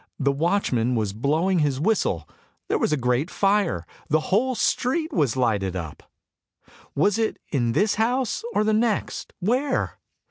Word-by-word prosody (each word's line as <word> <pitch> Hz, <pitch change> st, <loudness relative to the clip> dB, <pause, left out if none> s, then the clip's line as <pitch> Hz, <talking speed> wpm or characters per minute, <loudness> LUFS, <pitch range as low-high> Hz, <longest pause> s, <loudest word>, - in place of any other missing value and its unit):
The 140 Hz, -1 st, +2 dB
watchman 140 Hz, -, +1 dB
was 105 Hz, -4 st, -1 dB
blowing 155 Hz, -, +1 dB
his 145 Hz, -3 st, +1 dB
whistle; 145 Hz, -, 0 dB, 0.4 s
there -, -, +1 dB
was -, -, +1 dB
a 150 Hz, -, +2 dB
great 125 Hz, +5 st, 0 dB
fire, 195 Hz, -, +1 dB, 0.2 s
the 155 Hz, -, +3 dB
whole 255 Hz, +5 st, +2 dB
street 310 Hz, +8 st, 0 dB
was 135 Hz, -, +1 dB
lighted 100 Hz, -7 st, 0 dB
up. 80 Hz, -5 st, -6 dB, 0.9 s
Was 205 Hz, +9 st, +2 dB
it 225 Hz, -, 0 dB
in 120 Hz, -5 st, +1 dB
this 200 Hz, -, +2 dB
house, 250 Hz, -, 0 dB
or -, -, +3 dB
the 215 Hz, 0 st, +2 dB
next? 220 Hz, -1 st, -1 dB
Where? 255 Hz, +8 st, 0 dB
160 Hz, 150 wpm, -24 LUFS, -, 0.9 s, the